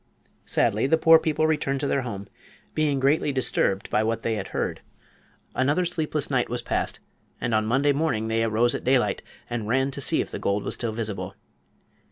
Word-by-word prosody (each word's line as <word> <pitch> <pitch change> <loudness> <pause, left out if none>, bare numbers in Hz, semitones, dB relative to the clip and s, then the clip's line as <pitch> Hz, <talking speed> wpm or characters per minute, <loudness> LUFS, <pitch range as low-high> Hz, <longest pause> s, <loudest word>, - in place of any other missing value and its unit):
Sadly 110 +5 +2
the 160 - +4
poor 160 0 +7
people 155 -1 0
returned 150 -3 0
to 145 - 0
their 140 - +1
home, 100 -5 -6 0.5
being 150 -3 +1
greatly 140 +2 +2
disturbed 120 -6 0
by - - +3
what 115 +1 -1
they 115 - 0
had 100 -3 -3
heard. - - -3 0.7
Another 145 +7 +1
sleepless 155 -4 -1
night 125 -2 +1
was 120 +1 -3
passed, - - -2 0.4
and 120 - -2
on 110 0 +2
Monday 135 +5 +3
morning 140 -7 0
they 115 0 +1
arose 115 +2 +2
at - - -4
daylight 125 -6 +2 0.3
and 115 -3 -3
ran 135 +4 +1
to 140 - -6
see - - +2
if - - -2
the - - -5
gold 100 +1 0
was - - -3
still 115 -2 -2
visible. 110 -2 -4
125 Hz, 195 wpm, -25 LUFS, 110-145 Hz, 0.7 s, poor